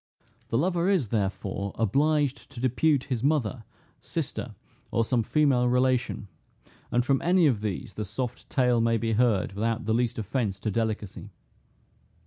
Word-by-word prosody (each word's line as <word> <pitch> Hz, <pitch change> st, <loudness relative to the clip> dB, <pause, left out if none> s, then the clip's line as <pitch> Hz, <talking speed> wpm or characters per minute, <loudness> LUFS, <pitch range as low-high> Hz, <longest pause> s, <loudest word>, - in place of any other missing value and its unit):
The 115 Hz, -, 0 dB
lover 175 Hz, +4 st, +1 dB
is, 175 Hz, -, +2 dB
therefore, 100 Hz, -2 st, -2 dB
obliged 140 Hz, +5 st, +1 dB
to 120 Hz, -, -10 dB
depute 130 Hz, +3 st, +2 dB
his 125 Hz, -4 st, -3 dB
mother, 130 Hz, -6 st, 0 dB, 0.3 s
sister, -, -, -4 dB, 0.3 s
or 115 Hz, -, +1 dB
some 120 Hz, 0 st, +1 dB
female 130 Hz, 0 st, +2 dB
relation; 125 Hz, -3 st, +1 dB, 0.6 s
and 120 Hz, +1 st, +1 dB
from 135 Hz, -1 st, +2 dB
any 180 Hz, 0 st, +4 dB
of 120 Hz, -8 st, +2 dB
these 105 Hz, +2 st, -4 dB
the 105 Hz, -, -4 dB
soft 115 Hz, +5 st, -5 dB
tale 125 Hz, -3 st, +2 dB
may 115 Hz, 0 st, +2 dB
be 115 Hz, 0 st, -1 dB
heard 110 Hz, -5 st, +2 dB
without 115 Hz, +3 st, -1 dB
the 110 Hz, -, +1 dB
least 120 Hz, 0 st, 0 dB
offence 110 Hz, -2 st, -2 dB
to 110 Hz, -, -1 dB
delicacy. 110 Hz, -2 st, -3 dB
120 Hz, 150 wpm, -27 LUFS, 110-135 Hz, 0.6 s, any